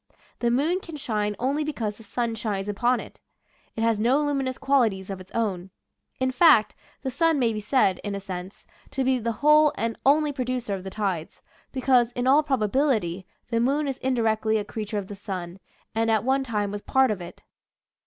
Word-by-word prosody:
The 240 Hz, -, +1 dB
moon 300 Hz, +9 st, +1 dB
can 330 Hz, -5 st, -9 dB
shine 210 Hz, -6 st, -2 dB
only 275 Hz, +6 st, 0 dB
because 225 Hz, -9 st, -3 dB
the -, -, -14 dB
sun 235 Hz, +2 st, -2 dB
shines 210 Hz, -3 st, -3 dB
upon 240 Hz, +5 st, +1 dB
it. -, -, -11 dB, 0.5 s
It 225 Hz, -, -3 dB
has 225 Hz, -2 st, +2 dB
no 245 Hz, +6 st, +3 dB
luminous 275 Hz, -3 st, -1 dB
qualities 220 Hz, -9 st, +1 dB
of 190 Hz, -1 st, -6 dB
its 185 Hz, -, -14 dB
own. 195 Hz, -5 st, -2 dB, 0.5 s
In 260 Hz, 0 st, +1 dB
fact, 290 Hz, -, +5 dB, 0.3 s
the 265 Hz, -, -2 dB
sun 325 Hz, +4 st, +2 dB
may 235 Hz, -4 st, +2 dB
be 215 Hz, -, -3 dB
said 210 Hz, -4 st, +2 dB
— -, -, -34 dB
in 205 Hz, -1 st, -3 dB
a -, -, -3 dB
sense 190 Hz, 0 st, -8 dB
— -, -, -27 dB
to 270 Hz, -, 0 dB
be 260 Hz, 0 st, +2 dB
the 230 Hz, 0 st, -1 dB
whole 300 Hz, 0 st, +6 dB
and 230 Hz, 0 st, -1 dB
only 295 Hz, +2 st, +4 dB
producer 255 Hz, -4 st, -2 dB
of 190 Hz, -2 st, -4 dB
the 190 Hz, -, -5 dB
tides, 190 Hz, -6 st, -3 dB, 0.3 s
because, 250 Hz, -2 st, +2 dB
in 245 Hz, 0 st, -2 dB
all 275 Hz, +4 st, +6 dB
probability, 225 Hz, -, 0 dB, 0.2 s
the 230 Hz, -, +2 dB
moon 280 Hz, +5 st, +1 dB
is 270 Hz, -2 st, -3 dB
indirectly 220 Hz, -4 st, +1 dB
a 210 Hz, -, -2 dB
creature 210 Hz, 0 st, -4 dB
of 200 Hz, -, -3 dB
the 205 Hz, -, -8 dB
sun, 190 Hz, -3 st, -6 dB, 0.3 s
and 225 Hz, 0 st, +1 dB
at 220 Hz, -2 st, +2 dB
one 265 Hz, +2 st, +2 dB
time 210 Hz, -5 st, -2 dB
was 205 Hz, 0 st, -5 dB
part 265 Hz, +1 st, +3 dB
of 200 Hz, -4 st, -3 dB
it. 175 Hz, -, -10 dB
230 Hz, 205 wpm, -25 LUFS, 205-265 Hz, 0.5 s, whole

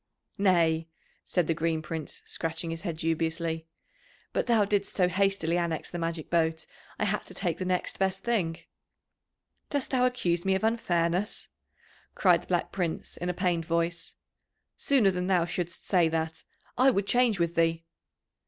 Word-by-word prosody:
"Nay," 165 Hz, -4 st, +3 dB, 0.4 s
said 180 Hz, -3 st, +1 dB
the 165 Hz, -, +1 dB
Green 160 Hz, 0 st, -1 dB
Prince, 155 Hz, -1 st, -5 dB
scratching 165 Hz, 0 st, -3 dB
his 165 Hz, 0 st, -5 dB
head 165 Hz, -1 st, -3 dB
dubiously. 165 Hz, 0 st, -1 dB, 0.7 s
"But -, -, 0 dB
thou 225 Hz, -4 st, +4 dB
didst 200 Hz, 0 st, 0 dB
so 180 Hz, -2 st, +4 dB
hastily 185 Hz, -3 st, +1 dB
annex 170 Hz, -2 st, -2 dB
the 175 Hz, -, -4 dB
magic 165 Hz, -1 st, -3 dB
boat, 160 Hz, -1 st, +1 dB, 0.3 s
I -, -, 0 dB
had 210 Hz, 0 st, 0 dB
to -, -, -11 dB
take 175 Hz, -4 st, -1 dB
the 185 Hz, -, -2 dB
next 180 Hz, 0 st, -1 dB
best 190 Hz, 0 st, 0 dB
thing." 185 Hz, -9 st, 0 dB, 1.1 s
"Dost 285 Hz, -3 st, -1 dB
thou 255 Hz, -1 st, +4 dB
accuse 175 Hz, -9 st, 0 dB
me 190 Hz, 0 st, +2 dB
of 190 Hz, -, -2 dB
unfairness?" 185 Hz, -4 st, 0 dB, 0.7 s
cried -, -, +4 dB
the -, -, -17 dB
Black -, -, 0 dB
Prince 175 Hz, -4 st, -3 dB
in 175 Hz, -, -3 dB
a -, -, 0 dB
pained 175 Hz, -3 st, 0 dB
voice. 170 Hz, 0 st, -1 dB, 0.6 s
"Sooner 250 Hz, -9 st, +3 dB
than 180 Hz, 0 st, -2 dB
thou 180 Hz, -3 st, +3 dB
shouldst 175 Hz, 0 st, -3 dB
say 175 Hz, -4 st, +3 dB
that, 160 Hz, 0 st, -2 dB, 0.3 s
I 260 Hz, +1 st, +7 dB
would 200 Hz, -6 st, +1 dB
change 245 Hz, -1 st, +3 dB
with 170 Hz, 0 st, +1 dB
thee." 165 Hz, -1 st, +1 dB
175 Hz, 165 wpm, -28 LUFS, 165-195 Hz, 1.1 s, I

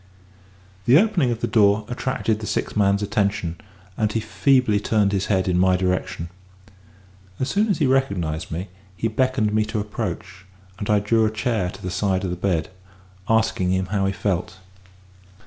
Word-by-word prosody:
The 125 Hz, +4 st, +6 dB
opening 190 Hz, -, +3 dB
of 120 Hz, -1 st, -3 dB
the -, -, 0 dB
door 105 Hz, 0 st, +3 dB
attracted 120 Hz, -3 st, -1 dB
the 110 Hz, -, -6 dB
sick -, -, -2 dB
man's 100 Hz, -1 st, +2 dB
attention, 100 Hz, -5 st, -1 dB, 0.3 s
and 105 Hz, +1 st, 0 dB
he 115 Hz, -, 0 dB
feebly 125 Hz, -2 st, +2 dB
turned 105 Hz, -1 st, +1 dB
his 100 Hz, -1 st, -1 dB
head 95 Hz, -2 st, +1 dB
in 90 Hz, -1 st, +2 dB
my 95 Hz, 0 st, +4 dB
direction. 90 Hz, -2 st, -2 dB, 1.1 s
As 130 Hz, -, -1 dB
soon 210 Hz, +2 st, +2 dB
as 200 Hz, -, +2 dB
he 155 Hz, -, +1 dB
recognised 100 Hz, -13 st, 0 dB
me, 90 Hz, +5 st, -5 dB, 0.3 s
he 115 Hz, -, 0 dB
beckoned 115 Hz, -1 st, 0 dB
me 110 Hz, 0 st, +3 dB
to 110 Hz, 0 st, -3 dB
approach; 105 Hz, -3 st, -5 dB, 0.4 s
and 105 Hz, -, -4 dB
I 105 Hz, -, +4 dB
drew 110 Hz, +2 st, +2 dB
a -, -, +1 dB
chair 110 Hz, -3 st, -1 dB
to -, -, -11 dB
the 90 Hz, -, -3 dB
side 95 Hz, -1 st, 0 dB
of 95 Hz, -, -2 dB
the -, -, -2 dB
bed, 90 Hz, -3 st, -1 dB, 0.6 s
asking 110 Hz, -4 st, +2 dB
him 95 Hz, 0 st, 0 dB
how 100 Hz, -1 st, +1 dB
he -, -, +1 dB
felt. 95 Hz, +1 st, -2 dB
105 Hz, 180 wpm, -22 LUFS, 95-115 Hz, 1.1 s, The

